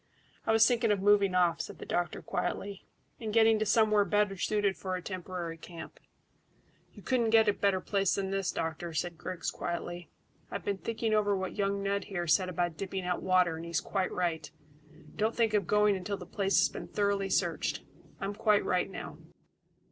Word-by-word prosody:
"I - - +4
was 225 0 +6
thinking 235 -2 +2
of 205 - +2
moving 200 -1 +4
off," 175 -2 +3
said - - -7
the - - -8
doctor 175 0 -2
quietly, 200 -1 -3 0.3
"and 220 -2 -4
getting 220 0 +5
to 215 - 0
somewhere 215 0 +4
better 205 -1 +1
suited 200 +1 0
for 185 -1 -4
a 180 - -4
temporary 180 -3 -5
camp." 170 0 -10 0.9
"You - - -14
couldn't 240 -3 +1
get 220 0 +5
a 205 - +4
better 195 -2 +1
place 195 0 +1
than 195 -1 -2
this, 195 -1 0
doctor," 165 +1 -4
said 170 +2 -2
Griggs 185 -2 -4
quietly. 175 0 -5 0.4
"I've - - -5
been 200 -1 -1
thinking 225 +1 -2
over 205 -2 +2
what 190 -1 -4
young 200 -1 0
Ned 200 0 -1
here 175 -4 -3
said 185 +3 +3
about 175 -2 -1
dipping 190 +1 -4
out 180 0 -1
water, 180 -3 +3
and 165 - -7
he's 170 -1 -1
quite 190 -2 -2
right. 165 -4 -2 0.7
Don't 220 +2 0
think 225 -2 +2
of 200 -5 +1
going 210 -1 +4
until 195 +2 -3
the - - -9
place 195 -1 0
has - - +5
been - - -7
thoroughly 200 -1 0
searched. - - 0 0.4
I'm 195 +1 -3
quite 210 0 +2
right 180 +1 +1
now." - - -8
195 Hz, 195 wpm, -30 LUFS, 180-210 Hz, 0.9 s, was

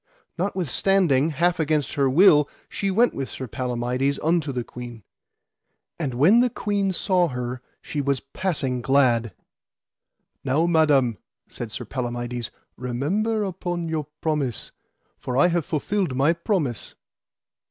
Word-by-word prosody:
Notwithstanding, 175 -4 +1
half 170 +4 +1
against 155 -2 0
her 140 -3 +2
will, 150 -1 +6 0.2
she 200 - -2
went 230 +6 +3
with 135 -1 -4
Sir 130 - -6
Palamides 125 +3 -1
unto 160 -2 +1
the 125 -2 -3
queen. 120 -2 -9 1.0
And 135 -7 -2
when 170 - +5
the 250 0 +4
queen 205 -3 -1
saw 185 -1 +2
her 125 -2 -4 0.2
she 145 - -3
was 140 -1 0
passing 135 -4 -2
glad. 120 -3 +3 1.1
Now, 140 +5 +2
Madam, 145 -9 +3 0.3
said 120 - -7 0.2
Palamides, 120 -1 -4 0.3
remember 185 - -1
upon 175 -3 -3
your 155 -2 -2
promise, 150 -7 -2 0.5
for 125 - -3
I 160 +6 +5
have 170 -3 0
fulfilled 175 0 -1
my 140 +5 +3
promise. 170 - -2
145 Hz, 125 wpm, -24 LUFS, 125-175 Hz, 1.1 s, will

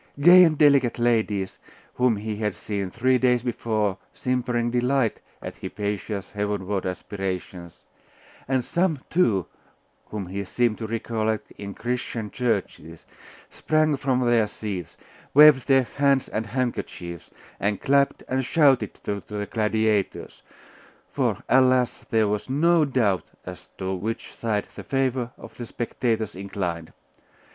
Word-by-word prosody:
Gay 175 +5 +9
and 160 -3 +3
delicate 140 -5 +4
ladies, 110 -5 0 0.3
whom 125 -2 +2
he 105 +1 -4
had 105 -2 -2
seen 100 -3 -4
three 125 +5 +2
days 125 -2 +2
before 110 -5 -1
simpering 125 -2 -1
delight 125 0 +1 0.2
at - - -7
Hypatia's 105 -1 -4
heavenward 105 -2 -2
aspirations, 90 -2 -5 0.6
and 130 -2 0
some, 170 -6 0
too, 110 - +2 0.6
whom 105 -2 -5
he 100 +3 -4
seemed 115 +3 0
to 110 - -4
recollect 110 -1 -2
in 100 -1 -8
Christian 120 -3 -3
churches, 100 - -3 0.5
sprang 155 -1 +1
from 130 -2 0
their 120 -3 +3
seats, 100 -6 -6 0.4
waved 150 -3 +8
their 135 -2 +5
hands 140 +1 +1
and 110 0 -3
handkerchiefs, 105 - -4 0.3
and 100 -1 0
clapped 140 0 +2
and 130 +1 0
shouted 135 - +3
to 100 -1 -3
the 105 -1 -4
gladiators. 110 -2 -1 0.7
For, - - -1
alas! 130 -1 +3
there 110 -2 +3
was 105 +3 -2
no 160 +4 +3
doubt 115 -9 +1 0.2
as - - -9
to 95 0 -3
which 105 +5 -4
side 105 -3 -2
the - - -8
favour 130 -3 0
of - - -13
the 120 - -5
spectators 115 -3 -2
inclined. 90 -4 -4
115 Hz, 130 wpm, -24 LUFS, 100-130 Hz, 0.7 s, Gay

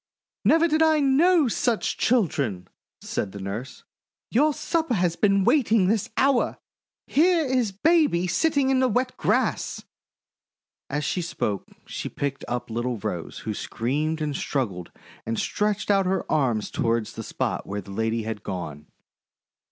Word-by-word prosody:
"Never 330 +1 +5
did 310 0 +1
I 315 -1 +4
know 295 +3 +4
such 235 0 0
children!" 140 - 0 0.4
said 95 - -3
the 100 - -7
nurse. 105 +7 -6 0.5
"Your 295 +7 +4
supper 315 -1 -1
has 175 -3 +1
been 195 0 +3
waiting 225 -5 +3
this 210 +1 +1
hour! 270 -2 +2 0.5
Here 335 +2 +3
is 255 -5 +1
baby 285 - +3
sitting 275 - +2
in 265 - +3
the 260 - +3
wet 255 +2 0
grass!' - - 0 1.1
As 150 +1 -2
she 180 - -1
spoke 150 - -3 0.2
she - - -5
picked 140 -1 -4
up 120 -1 -4
little 120 +1 -2
Rose, 90 -4 -5
who 110 - -2
screamed 150 +10 -2
and 150 -2 -2
struggled 100 - -3 0.3
and 115 0 -3
stretched 210 0 0
out 195 -2 +3
her 190 0 0
arms 120 -8 +1
toward 115 -1 0
the - - -8
spot - - -3
where 100 +1 -3
the 100 - -12
lady 110 +2 -1
had 110 -1 -4
gone. 75 -5 -6
180 Hz, 150 wpm, -25 LUFS, -, 1.1 s, Never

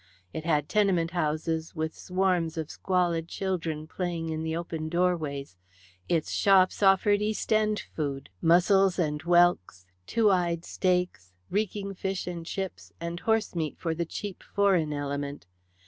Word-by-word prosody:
It 160 - -5
had 150 -3 +1
tenement 185 -6 +2
houses 160 0 -1
with 160 0 -2
swarms 180 -3 0
of 160 -1 -3
squalid 175 -3 0
children 165 -5 -3
playing 170 -1 -3
in 160 0 -2
the 160 0 -2
open 165 -2 -4
doorways, 155 - -1 0.5
its 165 -3 0
shops 190 -1 +4
offered 205 +1 +4
East 215 +1 -1
End 215 -1 +2 0.2
food 140 -3 -3
mussels 180 +3 +4
and 150 -4 0
whelks, 175 - +3 0.2
"two 220 -2 +3
eyed 170 -2 0
steaks," 180 - -1 0.2
reeking 200 0 -1
fish 190 0 -3
and 170 -2 -6
chips, 190 0 -5
and 170 +1 -4
horsemeat 205 -9 0
for 165 -2 -2
the 170 +1 -2
cheap 195 +3 -6
foreign 190 -7 +3
element. 145 -3 -4
170 Hz, 140 wpm, -28 LUFS, 160-190 Hz, 0.5 s, shops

